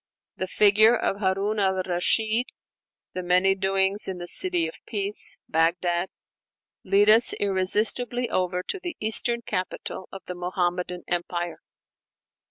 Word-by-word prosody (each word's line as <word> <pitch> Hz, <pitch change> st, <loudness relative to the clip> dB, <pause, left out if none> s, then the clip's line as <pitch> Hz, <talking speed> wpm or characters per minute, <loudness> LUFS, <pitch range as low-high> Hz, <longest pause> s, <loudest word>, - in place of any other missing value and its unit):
The 185 Hz, -, -3 dB
figure 215 Hz, +4 st, +5 dB
of 195 Hz, -, -2 dB
Harun 200 Hz, +2 st, -1 dB
al 190 Hz, -1 st, +1 dB
Rashid, 215 Hz, +6 st, 0 dB, 0.7 s
the 185 Hz, -, -4 dB
many 180 Hz, +2 st, +3 dB
doings 195 Hz, +1 st, 0 dB
in 190 Hz, -1 st, -4 dB
the 175 Hz, -, -7 dB
"City 350 Hz, -, +1 dB
of -, -, -11 dB
Peace" 205 Hz, -1 st, -2 dB
(Bagdad), 170 Hz, +2 st, 0 dB, 0.7 s
lead 205 Hz, +1 st, +3 dB
us 225 Hz, +2 st, +6 dB
irresistibly 215 Hz, +5 st, +1 dB
over 180 Hz, -2 st, -1 dB
to 390 Hz, -, -4 dB
the 350 Hz, -2 st, -6 dB
Eastern 235 Hz, +2 st, +3 dB
capital 185 Hz, -1 st, -5 dB
of 195 Hz, -, -10 dB
the 180 Hz, -, -6 dB
Muhammadan 180 Hz, 0 st, -3 dB
Empire. 175 Hz, 0 st, -3 dB
190 Hz, 130 wpm, -25 LUFS, 180-215 Hz, 0.7 s, us